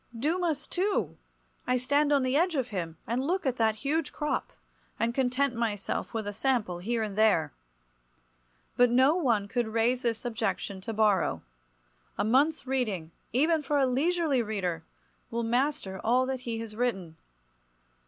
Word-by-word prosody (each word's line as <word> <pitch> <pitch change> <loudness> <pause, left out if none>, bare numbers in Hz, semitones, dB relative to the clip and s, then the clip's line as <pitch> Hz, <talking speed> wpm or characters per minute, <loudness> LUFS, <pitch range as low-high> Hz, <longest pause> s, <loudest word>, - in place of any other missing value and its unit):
Dumas, 315 +3 0
too! 390 +3 -1 0.5
I 250 0 +3
stand 285 +4 +2
on 280 -2 +4
the 255 +1 0
edge 340 +2 +2
of 260 -3 -1
him, 170 -6 -4
and 240 +4 -1
look 360 +5 -1
at 255 -2 0
that 220 -1 +2
huge 295 +8 -1
crop, 300 -1 -2 0.5
and 230 +1 +1
content 265 +1 +1
myself 210 -4 -2
with 220 -2 -3
a 205 - -4
sample 215 -6 0
here 225 +5 -1
and 205 -2 -4
there. 200 - +3 1.2
But 245 0 +5
no 260 +5 +5
one 235 - +1
could 235 +2 -1
raise 230 +3 +1
this 235 -1 -2
objection 215 -4 -2
to 225 - -4
Borrow. 210 -2 +2 0.7
A - - +1
month's 275 +9 +2
reading—even 255 - 0
for 295 0 0
a 275 - +4
leisurely 290 +1 +1
reader—will 200 +2 -5
master 240 -5 -1
all 250 +3 +3
that 260 0 -2
he 235 -2 -4
has 220 -2 -8
written. 195 -9 -2
245 Hz, 155 wpm, -29 LUFS, 215-275 Hz, 1.2 s, But